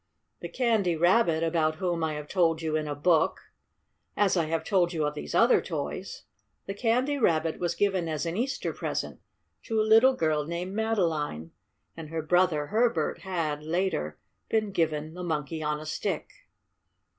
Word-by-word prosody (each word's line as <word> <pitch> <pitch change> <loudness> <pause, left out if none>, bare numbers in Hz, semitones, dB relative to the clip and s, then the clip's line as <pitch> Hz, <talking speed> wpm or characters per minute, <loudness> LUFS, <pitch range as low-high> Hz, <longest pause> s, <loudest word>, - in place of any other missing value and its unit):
The - - -6
Candy 220 -8 +1
Rabbit 170 -1 +3
about 160 -1 +1
whom 175 -1 -1
I 155 -1 -1
have 150 0 -6
told 165 -3 +2
you 155 -1 -1
in 155 -1 -1
a 145 - -3
book, 160 +2 +2 0.8
as 205 -2 +3
I 170 -3 +2
have 160 0 -2
told 180 -2 +1
you 155 -2 0
of 150 - -1
these 150 - -6
other - - +5
toys - - -5 0.4
the 195 - -4
Candy 250 +7 +1
Rabbit 165 -7 +1
was 175 -1 -1
given 190 -3 +1
as 155 +1 -2
an 165 +1 -2
Easter 260 +6 -2
present - - -4 0.5
to 225 -2 0
a - - +4
little 225 +5 +6
girl 155 -5 +1
named 175 +4 -4
Madeline, 165 - -1 0.4
and 160 -2 -8
her 160 0 -3
brother 175 -2 +2
Herbert 230 +7 +1
had, 165 -6 -2
later, 160 - -1 0.3
been 215 -2 0
given 160 -3 -1
the 180 - -7
Monkey 160 -2 -3
on 150 0 -1
a 155 - -9
Stick. 155 - -3
170 Hz, 170 wpm, -28 LUFS, 155-195 Hz, 0.8 s, little